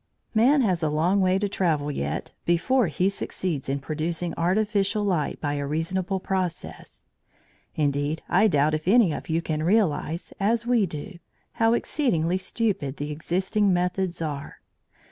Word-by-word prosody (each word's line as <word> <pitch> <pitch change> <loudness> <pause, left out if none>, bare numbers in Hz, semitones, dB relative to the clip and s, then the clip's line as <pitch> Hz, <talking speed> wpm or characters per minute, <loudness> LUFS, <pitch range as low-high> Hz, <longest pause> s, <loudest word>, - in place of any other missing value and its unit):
Man 255 +6 +4
has 185 -8 +1
a 155 - +1
long 170 +6 +2
way 185 0 +3
to 205 +1 0
travel 160 -7 0
yet 75 - -3
before 205 +7 +2
he 175 +4 0
succeeds 180 -7 -3
in 135 - 0
producing 160 +4 -3
artificial 200 +3 +1
light 180 -7 0
by 145 -1 -2
a 145 -1 -2
reasonable 180 +5 -1
process. 185 -3 -4 0.7
Indeed 145 +1 0
I 190 +5 +4
doubt 150 -4 +2
if 155 +2 -3
any 205 -5 +5
of - - -7
you 165 +1 0
can 155 -1 -2
realise, 170 -3 0
as 225 +3 +1
we 240 -5 +3
do, 170 +4 -7 0.4
how 225 0 +5
exceedingly 185 - 0
stupid 190 - -2
the 145 +1 -4
existing 190 +6 0
methods 180 -1 0
are. 145 -3 -5
175 Hz, 150 wpm, -25 LUFS, 155-200 Hz, 0.7 s, any